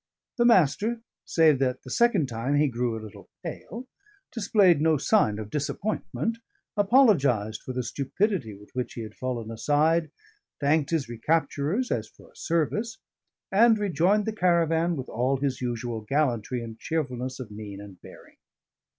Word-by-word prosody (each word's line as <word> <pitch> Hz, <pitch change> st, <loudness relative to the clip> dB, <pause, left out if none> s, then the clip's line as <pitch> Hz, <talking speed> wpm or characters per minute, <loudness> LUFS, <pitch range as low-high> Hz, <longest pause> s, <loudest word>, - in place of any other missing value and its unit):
The 240 Hz, -, +4 dB
Master, 215 Hz, -, +3 dB, 0.3 s
save 155 Hz, -5 st, +4 dB
that 130 Hz, -2 st, -1 dB
the 130 Hz, -, -9 dB
second 230 Hz, -, +3 dB
time 120 Hz, +4 st, -2 dB
he 150 Hz, +1 st, +4 dB
grew 120 Hz, -2 st, -2 dB
a 110 Hz, -, -8 dB
little 110 Hz, -, -12 dB
pale, 245 Hz, +3 st, -7 dB, 0.4 s
displayed 200 Hz, -, +3 dB
no 160 Hz, -1 st, +3 dB
sign 140 Hz, -, +2 dB
of 105 Hz, -1 st, -7 dB
disappointment, 210 Hz, +8 st, -2 dB, 0.4 s
apologised 165 Hz, -, +3 dB
for -, -, -6 dB
the 125 Hz, 0 st, -2 dB
stupidity 140 Hz, -, -1 dB
with 105 Hz, +1 st, -16 dB
which 125 Hz, -1 st, -4 dB
he 115 Hz, -, -5 dB
had 110 Hz, -, -9 dB
fallen 120 Hz, -3 st, -4 dB
aside, 155 Hz, +7 st, +2 dB, 0.5 s
thanked 145 Hz, 0 st, +2 dB
his 160 Hz, -4 st, 0 dB
recapturers 155 Hz, -, -1 dB
as -, -, -1 dB
for -, -, -19 dB
a -, -, -31 dB
service, 205 Hz, +8 st, -1 dB, 0.5 s
and 225 Hz, +3 st, +5 dB
rejoined 200 Hz, +1 st, +2 dB
the 220 Hz, -, -2 dB
caravan 170 Hz, -3 st, +2 dB
with 130 Hz, -3 st, -5 dB
all 130 Hz, +4 st, 0 dB
his 135 Hz, -1 st, -2 dB
usual 120 Hz, -2 st, -3 dB
gallantry 125 Hz, -1 st, -1 dB
and 115 Hz, -1 st, -9 dB
cheerfulness 130 Hz, -5 st, -3 dB
of 120 Hz, -5 st, -7 dB
mien 105 Hz, -1 st, -8 dB
and 100 Hz, -3 st, -12 dB
bearing. -, -, -15 dB
145 Hz, 155 wpm, -26 LUFS, 120-185 Hz, 0.5 s, and